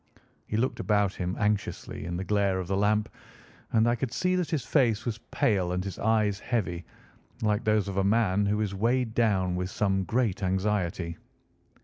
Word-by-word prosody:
He 105 Hz, -, -1 dB
looked 125 Hz, +4 st, 0 dB
about 105 Hz, -2 st, +2 dB
him 90 Hz, 0 st, -3 dB
anxiously 105 Hz, -5 st, -2 dB
in 85 Hz, 0 st, -3 dB
the 95 Hz, -, -3 dB
glare 100 Hz, -1 st, +1 dB
of 90 Hz, -, -4 dB
the 95 Hz, -, 0 dB
lamp, 105 Hz, +2 st, +2 dB, 0.6 s
and 110 Hz, 0 st, +3 dB
I 120 Hz, -, +3 dB
could 120 Hz, 0 st, -2 dB
see 185 Hz, +7 st, +1 dB
that 180 Hz, -3 st, -1 dB
his 150 Hz, -7 st, -1 dB
face 115 Hz, -7 st, +2 dB
was 115 Hz, -2 st, -3 dB
pale 95 Hz, -5 st, +1 dB
and 90 Hz, 0 st, -1 dB
his 100 Hz, -1 st, -6 dB
eyes 105 Hz, -2 st, +2 dB
heavy, 90 Hz, -9 st, -2 dB, 0.6 s
like 105 Hz, +1 st, +1 dB
those 105 Hz, -2 st, +2 dB
of 100 Hz, -1 st, -4 dB
a 95 Hz, -, +3 dB
man 100 Hz, -1 st, +2 dB
who 105 Hz, +1 st, +1 dB
is 100 Hz, -2 st, -1 dB
weighed 115 Hz, +3 st, +1 dB
down 95 Hz, -6 st, +2 dB
with 90 Hz, 0 st, -2 dB
some 95 Hz, -1 st, 0 dB
great 115 Hz, -4 st, 0 dB
anxiety. 95 Hz, -3 st, -1 dB
105 Hz, 190 wpm, -28 LUFS, 95-110 Hz, 0.6 s, and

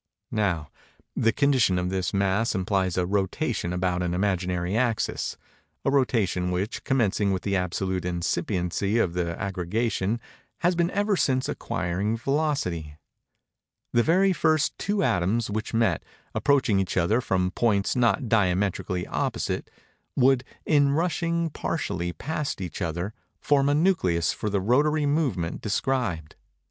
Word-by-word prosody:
Now, 90 Hz, -, -1 dB, 0.4 s
the 115 Hz, -, +3 dB
condition 130 Hz, -9 st, +3 dB
of 90 Hz, 0 st, -1 dB
this 95 Hz, -1 st, -1 dB
mass 100 Hz, +3 st, +1 dB
implies 95 Hz, -1 st, 0 dB
a 90 Hz, -, +2 dB
rotation 100 Hz, -, -1 dB
about 90 Hz, 0 st, 0 dB
an 90 Hz, 0 st, -1 dB
imaginary 90 Hz, -1 st, 0 dB
axis—a 115 Hz, -, -2 dB
rotation 110 Hz, -10 st, +1 dB
which, 95 Hz, +5 st, -2 dB
commencing 105 Hz, -6 st, +1 dB
with 95 Hz, -1 st, -2 dB
the 100 Hz, -1 st, 0 dB
absolute 95 Hz, 0 st, -1 dB
incipiency 90 Hz, +3 st, -1 dB
of 95 Hz, -7 st, +1 dB
the 85 Hz, -1 st, -2 dB
aggregation, 100 Hz, +3 st, -1 dB, 0.4 s
has 175 Hz, +2 st, +3 dB
been 170 Hz, 0 st, +2 dB
ever 205 Hz, +1 st, +1 dB
since 130 Hz, -6 st, +1 dB
acquiring 95 Hz, +5 st, -2 dB
velocity. 115 Hz, -, -1 dB, 1.0 s
The 120 Hz, -, +5 dB
very 185 Hz, +8 st, +3 dB
first 155 Hz, -2 st, +2 dB
two 205 Hz, -1 st, 0 dB
atoms 105 Hz, -, +1 dB
which 110 Hz, +2 st, -3 dB
met, 115 Hz, 0 st, +2 dB, 0.3 s
approaching 135 Hz, -8 st, +2 dB
each 95 Hz, -1 st, -2 dB
other 105 Hz, +8 st, +2 dB
from 90 Hz, -5 st, 0 dB
points 100 Hz, 0 st, +1 dB
not 120 Hz, 0 st, +2 dB
diametrically 95 Hz, -3 st, +1 dB
opposite, -, -, -2 dB, 0.5 s
would, 130 Hz, -1 st, +4 dB, 0.2 s
in 145 Hz, -2 st, +4 dB
rushing 170 Hz, 0 st, 0 dB
partially 90 Hz, -, -2 dB
past 150 Hz, -, -3 dB
each 90 Hz, 0 st, -5 dB
other, 85 Hz, +4 st, -2 dB, 0.3 s
form 140 Hz, -1 st, +2 dB
a 145 Hz, -, +3 dB
nucleus 150 Hz, -, +2 dB
for 105 Hz, -, -3 dB
the 100 Hz, -1 st, 0 dB
rotary 145 Hz, +8 st, +2 dB
movement 135 Hz, -, 0 dB
described. 105 Hz, -, -1 dB
100 Hz, 135 wpm, -26 LUFS, 90-135 Hz, 1.0 s, The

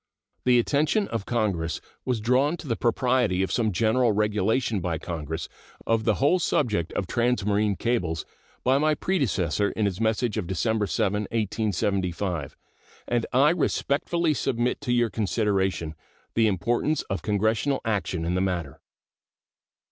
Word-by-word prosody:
The 125 Hz, -1 st, +5 dB
attention 150 Hz, -, +2 dB
of 115 Hz, -3 st, -4 dB
Congress 95 Hz, -9 st, -1 dB, 0.3 s
was 125 Hz, -3 st, 0 dB
drawn 130 Hz, +8 st, +2 dB
to 160 Hz, -, -10 dB
the 115 Hz, -, 0 dB
propriety 120 Hz, -5 st, +1 dB
of 95 Hz, -, -2 dB
some 110 Hz, -3 st, +1 dB
general 115 Hz, +4 st, +2 dB
regulation 105 Hz, +2 st, +1 dB
by 85 Hz, -2 st, -2 dB
Congress 80 Hz, -2 st, -5 dB, 0.4 s
of 115 Hz, -1 st, +1 dB
the 110 Hz, -, +3 dB
whole 145 Hz, +7 st, +3 dB
subject 105 Hz, -, 0 dB
of 100 Hz, -, -1 dB
transmarine 105 Hz, -2 st, +1 dB
cables 90 Hz, -10 st, -1 dB, 0.4 s
by 130 Hz, +2 st, +3 dB
my 155 Hz, +1 st, +2 dB
predecessor 105 Hz, -, 0 dB
in 110 Hz, -, 0 dB
his 100 Hz, +1 st, -2 dB
message 110 Hz, 0 st, +1 dB
of 90 Hz, -, -4 dB
December 105 Hz, +3 st, 0 dB
7, 105 Hz, +2 st, 0 dB
1875, 100 Hz, -, -1 dB, 0.5 s
and 120 Hz, -1 st, 0 dB
I 140 Hz, +4 st, +5 dB
respectfully 165 Hz, 0 st, 0 dB
submit 125 Hz, -2 st, -1 dB
to 135 Hz, -4 st, -2 dB
your 120 Hz, -2 st, +2 dB
consideration 95 Hz, -6 st, 0 dB, 0.4 s
the 115 Hz, -1 st, +3 dB
importance 120 Hz, -, 0 dB
of 95 Hz, -4 st, -4 dB
Congressional 110 Hz, -, +1 dB
action 95 Hz, -6 st, -1 dB
in 85 Hz, -, 0 dB
the 90 Hz, -, +1 dB
matter. 90 Hz, -7 st, -2 dB
110 Hz, 140 wpm, -26 LUFS, 95-125 Hz, 0.5 s, The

